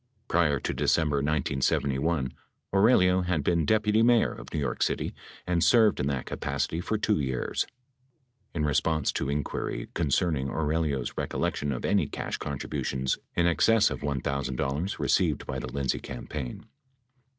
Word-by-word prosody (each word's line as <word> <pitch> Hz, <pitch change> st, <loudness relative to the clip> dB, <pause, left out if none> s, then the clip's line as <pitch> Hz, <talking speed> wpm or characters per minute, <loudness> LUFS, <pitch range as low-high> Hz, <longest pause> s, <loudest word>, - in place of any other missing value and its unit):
Prior 75 Hz, -5 st, +2 dB
to -, -, -2 dB
Decem 80 Hz, -2 st, +2 dB
ber 70 Hz, -, +1 dB
1971, 70 Hz, 0 st, 0 dB, 0.4 s
Aurelio 95 Hz, -3 st, +5 dB
had 90 Hz, -4 st, 0 dB
been 85 Hz, 0 st, +2 dB
deputy 110 Hz, +2 st, +3 dB
mayor 120 Hz, 0 st, +4 dB
of -, -, -11 dB
New 80 Hz, -, -2 dB
York 70 Hz, -, -2 dB
City -, -, 0 dB, 0.3 s
and 85 Hz, -2 st, +1 dB
served 110 Hz, -1 st, +5 dB
in 70 Hz, -, 0 dB
that 65 Hz, -3 st, -2 dB
capacity 80 Hz, -, -2 dB
for 110 Hz, +4 st, -1 dB
2 105 Hz, -3 st, +1 dB
years. 65 Hz, -3 st, -1 dB, 0.9 s
In 75 Hz, -2 st, 0 dB
response 75 Hz, +1 st, +1 dB
to 70 Hz, -, -2 dB
inquiry 70 Hz, +1 st, -3 dB
concerning 75 Hz, -3 st, +1 dB
Aurelio's 75 Hz, -3 st, -1 dB
recollection 70 Hz, -1 st, -1 dB
of 65 Hz, -, -3 dB
any -, -, +2 dB
cash -, -, -4 dB
contributions 65 Hz, -1 st, -2 dB, 0.2 s
in 85 Hz, -, +2 dB
excess 105 Hz, +6 st, +4 dB
of -, -, -4 dB
$1,000 70 Hz, +4 st, -2 dB
received -, -, +1 dB
by 65 Hz, -, -3 dB
the 65 Hz, 0 st, -6 dB
Lindsay 70 Hz, -1 st, -1 dB
campaign. 60 Hz, +1 st, -6 dB
75 Hz, 145 wpm, -28 LUFS, 70-90 Hz, 0.9 s, Aurelio